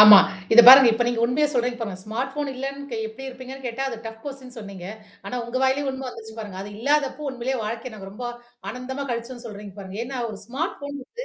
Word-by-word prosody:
ஆமா. 210 -1 +12 0.3
இத 240 - +11
பாருங்க. 260 -1 +12
இப்ப 240 +2 +1
நீங்க 240 -1 -1
உண்மையே 280 +5 +2
சொல்றீங்க 245 -1 0
பாருங்க. 200 -5 -4
ஸ்மார்ட் 250 +5 -3
ஃபோன் 290 -1 -2
இல்லன்னு 275 +2 -5
கே 230 - -3
எப்படி 245 +5 -10
இருப்பீங்கன்னு 260 +1 -9
கேட்டா, 250 +3 -3
அது 235 - -5
டஃப் 225 0 -8
கொஸ்டின்னு 265 -3 -8
சொன்னீங்க. 200 -4 -8 0.4
ஆனா 250 - -3
உங்க 235 +2 -4
வாயிலேயே 265 +2 +2
உண்ம 265 0 -6
வந்துருச்சு 220 -2 -10
பாருங்க. 205 -4 -7
அது 205 - -8
இல்லாதப்போ 285 +3 +1
உண்மையிலே 260 +1 -2
வாழ்க்கைய 230 +2 -4
நாங்க 195 -2 -9
ரொம்ப 245 +4 -7 0.5
ஆனந்தமா 260 +3 -5
கழிச்சோம்ன்னு 240 +1 -5
சொல்றீங்க 205 -2 -9
பாருங்க. 190 0 -8
ஏன்னா, 265 0 -5
ஒரு 215 - -6
ஸ்மார்ட் 275 +8 -3
ஃபோன் 285 0 -5
வந்து, 485 - -8
245 Hz, 215 wpm, -24 LUFS, 220-270 Hz, 0.5 s, ஆமா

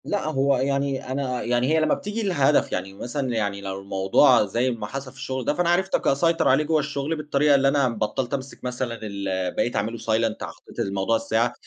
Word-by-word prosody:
لأ، 205 - -1
هو 140 -2 +2
يعني 140 0 -1
أنا 130 -2 -2
يعني 120 +1 +1
هي 160 - +4
لما 155 - +2
بتيجي 210 +2 -3
لهدف 150 -7 +2
يعني، 95 +1 -3
مثلًا 125 +7 -4
يعني 100 -2 -1
لو 95 0 -5
الموضوع- 100 +6 +4
زي 120 +6 0
ما 115 - -5
حصل 135 -1 -6
في 135 - -20
الشغل 130 -2 -4
ده- - - +2
فأنا 175 +2 0
عرفت 190 +2 +2
ك - - -4
أسيطر 165 +4 +2
عليه 135 +4 +4
جوا 155 +1 +2
الشغل 145 +1 -2
بالطريقة 150 -1 +2
اللي 135 0 +3
أنا 135 -2 +3
بطَّلت 115 +3 -2
أمْسك 135 0 -5
مثلًا 125 -2 -3
ال 95 -3 -2
بقيت 120 - 0
أعْمَله 110 +3 -1
silent 115 0 -1
حطيت - - -10
الموضوع 100 +3 0
الساعة، 115 +1 0
130 Hz, 205 wpm, -24 LUFS, 110-140 Hz, -, هي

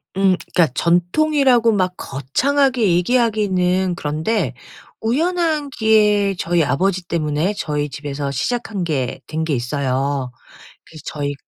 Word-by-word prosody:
음. 190 -1 +3 0.2
그러니까 170 -3 +4
전통이라고 240 - +3
막 185 -3 0
거창하게 245 - 0
얘기하기는 190 -4 +1
그런데 155 - -1 0.5
우연한 310 +4 0
기회에 210 -3 +3
저희 170 -1 +1
아버지 185 +6 0
때문에 160 +3 -1
저희 150 -1 -2
집에서 140 +1 -5
시작한 205 - -2
게 135 -7 -2
된 160 +1 -3
게 160 -2 -1
있어요. 130 +1 -2 0.5
그래서 155 -2 -13
저희 145 -1 -3
180 Hz, 295 characters per minute, -19 LUFS, 145-225 Hz, 0.5 s, 그러니까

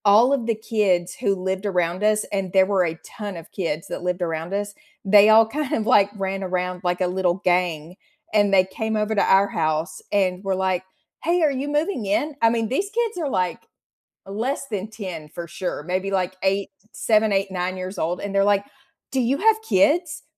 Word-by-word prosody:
All 220 +6 +6
of 245 -5 -1
the 230 - +1
kids 200 -5 0
who 200 -5 0
lived 190 +1 -3
around 180 -1 0
us 215 0 +3
and 195 -2 -2
there 190 -1 +5
were 190 -2 +2
a 165 0 -4
ton 205 -4 -7
of 165 - -11
kids 165 -4 -3
that - - -5
lived 180 0 -2
around 165 +2 -3
us, 205 0 -2 0.3
they 205 +1 +7
all 220 +1 +7
kind 290 +3 -3
of, 220 - 0
like, 200 -2 +5
ran 195 -1 -3
around 180 -1 -2
like 180 0 -1
a 180 - +2
little 180 -1 0
gang, 175 -2 0 0.4
and 205 -2 +3
they 185 -1 +6
came 220 +3 -3
over 215 0 0
to 205 - +2
our 195 +1 +4
house 155 0 -2
and 190 -2 +1
were, 195 -1 0
like, 185 -1 0 0.4
"Hey, 345 +2 +2
are 300 - +4
you 275 +1 -3
moving 295 - -1
in?" 285 +10 0
I 230 - +6
mean, 225 -1 0
these 335 - -1
kids 455 0 -1
are, 315 -5 -2
like, 185 -6 -2 0.6
less 235 +8 -3
than 210 -3 -4
10 185 -8 -7
for 170 +3 -7
sure, 180 -2 -4
maybe, 185 +3 -2
like, 185 -1 -1
8, 195 +1 0 0.2
7, 215 -1 +2
8, 195 0 0
9 185 0 -2
years 185 +1 -6
old, 170 +2 -1
and 200 -1 -5
they're, 195 0 +4
like, 200 0 +2 0.5
"Do 265 - +1
you 255 +3 +1
have 440 +2 +3
kids? 325 - +1
195 Hz, 210 wpm, -23 LUFS, 180-220 Hz, 0.6 s, they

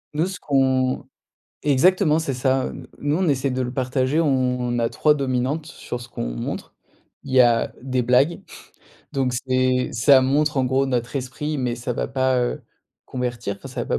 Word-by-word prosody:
Nous, 160 +4 +1
ce 190 - -6
qu'on 130 -2 +1 0.6
exactement 155 +3 +3
c'est 145 -4 -2
ça, 130 +1 +1
heu, - - -7
nous 145 +1 0
on 185 -4 +1
essaie 135 0 +1
de 130 0 -1
le 125 0 -2
partager, 130 +3 0
on 125 -5 +1
a 115 -1 +1
3 150 - +3
dominantes 140 +2 -1
sur 120 -6 -7
ce 120 - -11
qu'on - - -4
montre. - - -5 0.5
Il 135 - -8
y 130 - +4
a 120 -2 +4
des 130 -1 -1
blagues, 130 +7 +2 0.7
donc 130 -2 0
c'est 130 0 +1
ça 130 +3 +5
montre, 145 +3 +1
en 130 - +2
gros, 130 +2 +1
notre 125 -1 -2
esprit, 140 +3 -3
mais 125 -2 -1
ça 120 +1 -4
va - - -3
pas, 130 -1 +1
heu, 120 - -2 0.4
convertir 120 -5 -4
enfin 135 - -10
ça 130 -1 -5
va - - -1
130 Hz, 185 wpm, -22 LUFS, 125-140 Hz, 0.7 s, ça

